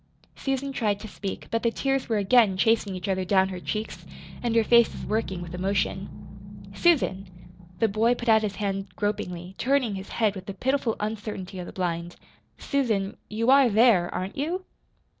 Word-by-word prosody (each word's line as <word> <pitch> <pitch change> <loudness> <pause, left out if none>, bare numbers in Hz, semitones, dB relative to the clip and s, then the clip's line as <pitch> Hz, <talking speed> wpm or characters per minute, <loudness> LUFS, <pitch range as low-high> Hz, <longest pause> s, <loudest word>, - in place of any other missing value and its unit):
Susan 270 0 -2
tried 210 -5 0
to 220 - -8
speak; 200 -1 -6
but 230 +1 0
the 235 - +2
tears 270 +2 -1
were 220 - +2
again 205 -1 +4
chasing 215 -1 +2
each 185 +2 -5
other 190 -1 0
down 190 0 +3
her 185 -1 -5
cheeks, 215 +4 -4 0.4
and 235 -2 -1
her 230 - +5
face 235 +1 +5
was - - -8
working 190 -5 -2
with 175 0 -9
emotion. 190 +2 -4
"Susan!" 255 - +2 0.5
The 225 - +3
boy 220 +4 +2
put 240 - -7
out 220 -1 +6
his 210 -2 -2
hand 195 -1 -2
gropingly, 185 -4 -3
turning 260 -4 +1
his 190 0 -7
head 215 -3 +1
with 190 -2 -9
the 200 - -5
pitiful 260 0 0
uncertainty 210 -3 -5
of 175 - -6
the - - -7
blind. 175 -1 -3 0.4
"Susan, 220 -8 -1
you 230 +4 +1
are 275 -2 +6
there, 215 -5 +4
aren't 185 +2 -4
you?" 345 +7 -2
210 Hz, 180 wpm, -26 LUFS, 190-235 Hz, 0.5 s, out